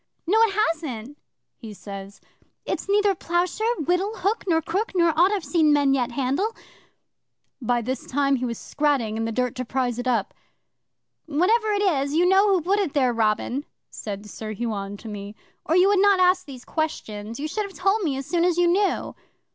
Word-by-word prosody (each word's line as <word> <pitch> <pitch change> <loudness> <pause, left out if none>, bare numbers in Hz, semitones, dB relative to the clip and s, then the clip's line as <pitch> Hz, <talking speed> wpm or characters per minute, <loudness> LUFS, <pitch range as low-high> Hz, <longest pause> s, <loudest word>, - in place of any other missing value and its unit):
'"No, 410 +6 +3
it 440 -4 +3 0.2
hasn't," 285 -3 -8 0.4
he 220 -3 -9
says. 195 0 -9 0.4
"It's - - -4
neither 410 0 +3
ploughshare, 365 +7 -1
whittle, 380 +6 0
hook, 410 +5 -1
nor 325 -3 +3
crook, 390 +8 -2
nor 340 -2 +4
aught 335 +4 +4
I've 405 -4 -1
yet 285 - -11
seen 315 -3 +4
men 285 -2 +3
handle." 270 - -1 1.1
By 240 0 0
this 260 +3 -4
time 275 0 +1
he 250 - -2
was 235 -2 -3
scratting 280 -7 0
in 225 0 -2
the 225 - -2
dirt 250 +2 -1
to 255 - -2
prise 250 -1 -2
it 245 - -3
up. 235 -5 0 0.9
'"Whatever 420 +9 +2
it 405 0 +1
is, 285 -6 +1
you 350 +2 +4
know 385 +2 +5
who 380 -3 +3
put 395 +4 +2
it 370 -8 -1
there, 255 -4 +2
Robin," 230 +4 0 0.3
said 205 -1 -7
Sir 215 +1 -6
Huon 205 -3 -4
to 225 - -11
me, 205 0 -7 0.3
"or 320 - +1
you 365 +2 +6
would 405 -1 +3
not 400 -1 +5
ask 365 -2 +3
those 255 -3 -10
questions. 225 -8 -4
You 300 - -2
should 420 +6 -2
have 385 - -14
told 390 +4 +2
me 295 -8 -1
as 270 - -5
soon 340 +2 0
as 350 -1 +2
you 350 - +4
knew." 390 +3 +1
295 Hz, 195 wpm, -24 LUFS, 240-370 Hz, 1.1 s, you